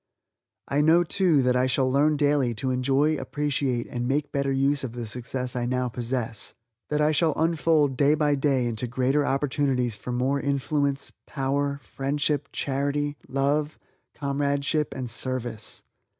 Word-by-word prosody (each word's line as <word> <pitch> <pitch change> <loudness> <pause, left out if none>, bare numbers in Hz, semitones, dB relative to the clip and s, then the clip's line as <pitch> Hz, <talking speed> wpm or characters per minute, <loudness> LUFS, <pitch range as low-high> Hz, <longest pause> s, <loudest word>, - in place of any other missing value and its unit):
I 140 +1 +1
know, 165 +3 +5
too, 170 -4 +3
that 125 0 +2
I 125 +1 +3
shall 130 +1 +2
learn 145 +3 +3
daily 145 -5 +2
to 130 +4 -1
enjoy, 135 +4 +2
appreciate, 135 -3 -1
and 120 0 -4
make 145 +2 0
better 140 -1 0
use 140 +1 +1
of 120 -3 -4
the 120 -1 -5
success 125 +3 -4
I 120 -1 -1
now 125 0 0
possess; 120 -2 -3 0.3
that 150 - 0
I 150 +1 +4
shall 155 0 +2
unfold 160 -4 +2
day 145 +2 +4
by 150 -1 +2
day 135 -3 +1
into 120 +1 -2
greater 130 +4 +1
opportunities 135 -4 0
for 105 +5 -7
more 130 +3 0
influence, 140 0 -1 0.2
power, 140 0 -1
friendship, 145 +1 -1
charity, 145 +1 -1
love, 145 +3 0 0.4
comradeship 140 +1 0
and 130 -1 -4
service. 120 -2 -2
140 Hz, 150 wpm, -26 LUFS, 125-145 Hz, 0.4 s, know